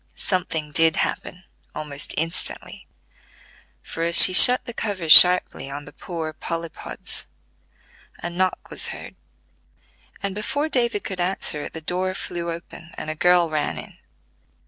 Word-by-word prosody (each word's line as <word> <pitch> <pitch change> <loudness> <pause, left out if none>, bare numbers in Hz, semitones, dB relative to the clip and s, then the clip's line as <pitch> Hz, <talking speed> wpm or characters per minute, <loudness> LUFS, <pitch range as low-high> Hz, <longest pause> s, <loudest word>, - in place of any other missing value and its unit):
Something 160 -5 -3
did 160 +1 +2
happen 180 +1 -5 0.3
almost 145 -2 -4
instantly; 165 +3 -5 1.0
for 165 - -9
as 170 0 +1
she 185 - +11
shut 250 +7 +8
the 240 - -9
cover 200 -7 -5
sharply 180 -3 +6
on 145 +1 -9
the - - -15
poor 160 -3 -8
Polypods, 165 +1 -7 0.9
a 175 - -8
knock 185 +1 -4
was - - -1
heard, - - -10 1.1
and 200 -1 -4
before 285 +9 -4
David 235 -7 -2
could 185 -2 -6
answer 175 -4 -3
it - - -11
the 160 - -9
door 185 +3 -4
flew 170 -3 -7
open 170 0 -12
and 155 - -6
a - - -8
girl 175 +1 +1
ran 155 -1 -4
in. - - -12
175 Hz, 145 wpm, -20 LUFS, 160-185 Hz, 1.1 s, she